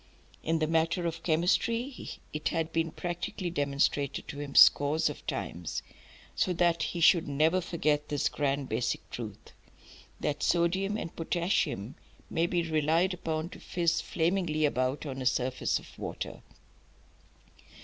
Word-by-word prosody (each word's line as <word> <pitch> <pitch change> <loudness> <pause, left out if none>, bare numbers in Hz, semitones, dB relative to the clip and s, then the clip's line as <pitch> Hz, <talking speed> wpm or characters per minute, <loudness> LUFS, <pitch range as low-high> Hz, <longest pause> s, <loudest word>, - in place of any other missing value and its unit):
In 165 +1 +1
the 155 - +1
matter 165 +2 +1
of 165 -1 -3
chemistry 190 - 0 0.2
it 150 0 -2
had 165 -1 -1
been 165 0 +1
practically 175 +1 -4
demonstrated 140 -2 0
to 145 - -6
him 145 -2 -6
scores 150 +2 +6
of - - -11
times, 85 -1 -4 0.5
so 185 - +1
that 170 -1 +2
he 170 - -2
should 170 0 +5
never 155 +6 +2
forget 150 -4 0
this 145 -2 +1
grand 140 -1 -1
basic 115 +1 -2
truth, 110 -2 -7 0.7
that 150 -1 -2
sodium 190 +4 +1
and 165 - -6
potassium 165 - -1 0.4
may 165 +1 +2
be 175 -1 0
relied 160 +4 +2
upon 160 -2 -3
to - - -11
fizz 170 -2 0
flamingly 165 -2 +1
about 130 +1 0
on 135 -2 -5
a - - -4
surface 125 0 +1
of - - -13
water. - - -5
160 Hz, 140 wpm, -30 LUFS, 145-175 Hz, 0.7 s, scores